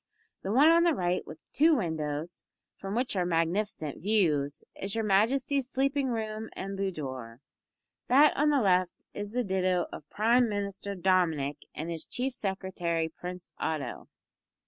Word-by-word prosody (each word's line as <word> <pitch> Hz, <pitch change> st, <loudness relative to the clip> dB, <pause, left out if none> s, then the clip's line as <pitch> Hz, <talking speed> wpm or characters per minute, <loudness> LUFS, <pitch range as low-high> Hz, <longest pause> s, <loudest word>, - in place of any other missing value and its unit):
The 195 Hz, -, -3 dB
one 280 Hz, +8 st, +6 dB
on 335 Hz, +1 st, +6 dB
the 340 Hz, -3 st, +3 dB
right 180 Hz, -3 st, 0 dB
with -, -, -8 dB, 0.2 s
two 315 Hz, +2 st, +5 dB
windows, 160 Hz, -, -3 dB, 0.3 s
from 195 Hz, +1 st, -5 dB
which 245 Hz, -2 st, 0 dB
are 185 Hz, -, +2 dB
magnificent 165 Hz, -1 st, -1 dB
views, 160 Hz, -9 st, +1 dB
is 195 Hz, +2 st, -4 dB
your 225 Hz, -, 0 dB
Majesty's 255 Hz, +6 st, +2 dB
sleeping 275 Hz, +1 st, +1 dB
room 220 Hz, -2 st, -3 dB
and 195 Hz, +1 st, -5 dB
boudoir; 130 Hz, -12 st, -4 dB, 0.7 s
that 285 Hz, +4 st, +6 dB
on 300 Hz, +2 st, +3 dB
the 285 Hz, -3 st, +3 dB
left 185 Hz, -2 st, +3 dB, 0.2 s
is 205 Hz, 0 st, -5 dB
the 250 Hz, +2 st, 0 dB
ditto 185 Hz, -3 st, +1 dB
of 150 Hz, -, -9 dB
Prime 235 Hz, +3 st, +3 dB
Minister 200 Hz, -1 st, -3 dB
Dominick 170 Hz, -6 st, +1 dB, 0.2 s
and 165 Hz, +2 st, -4 dB
his 165 Hz, -1 st, -5 dB
Chief 260 Hz, +1 st, -2 dB
Secretary 185 Hz, -6 st, -2 dB
Prince 180 Hz, +2 st, -8 dB
Otto. 145 Hz, -6 st, -3 dB
195 Hz, 150 wpm, -29 LUFS, 170-235 Hz, 0.7 s, one